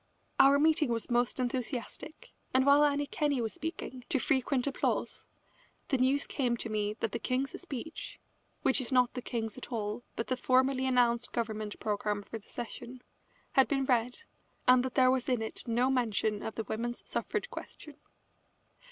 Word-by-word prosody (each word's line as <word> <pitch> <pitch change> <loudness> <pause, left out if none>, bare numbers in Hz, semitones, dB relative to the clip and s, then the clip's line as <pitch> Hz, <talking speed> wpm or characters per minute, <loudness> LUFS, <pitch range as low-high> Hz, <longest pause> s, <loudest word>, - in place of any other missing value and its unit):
Our 275 +1 +7
meeting 310 -1 +3
was 230 0 -2
most 240 +2 +1
enthusiastic, 250 +3 -4 0.2
and 260 0 +5
while 285 +1 +6
Annie 290 0 +2
Kenney 290 -2 0
was 225 -2 -2
speaking, 280 -5 -6
to 315 - +2
frequent 265 -1 +1
applause, 280 - -1 0.6
the 265 - +2
news 270 +3 +3
came 245 -4 0
to 230 - -5
me 210 -1 -1
that 225 - 0
the 235 - -3
King's 260 +3 -2
speech 320 -3 -7 0.4
(which 265 - +3
is 255 - -2
not 250 -2 +4
the 250 - -4
King's 230 -1 -4
at - - -10
all, 215 -1 -2
but 230 - -2
the 255 - 0
formally 260 +1 +2
announced 240 -2 +2
Government 215 -2 -3
programme 205 -1 -1
for 225 - -7
the 205 - -21
session) 245 +1 -7 0.5
had 265 - +5
been 270 -2 0
read, 245 - +1 0.4
and 250 0 +7
that 260 -1 -4
there 255 -1 +6
was 260 -1 0
in 245 -3 +1
it 220 - -6
no 245 +3 +2
mention 220 -4 0
of 220 - -5
the 225 - -2
women's 235 +3 -4
suffrage - - -3
question. 300 -2 -9
250 Hz, 175 wpm, -31 LUFS, 230-270 Hz, 0.6 s, Our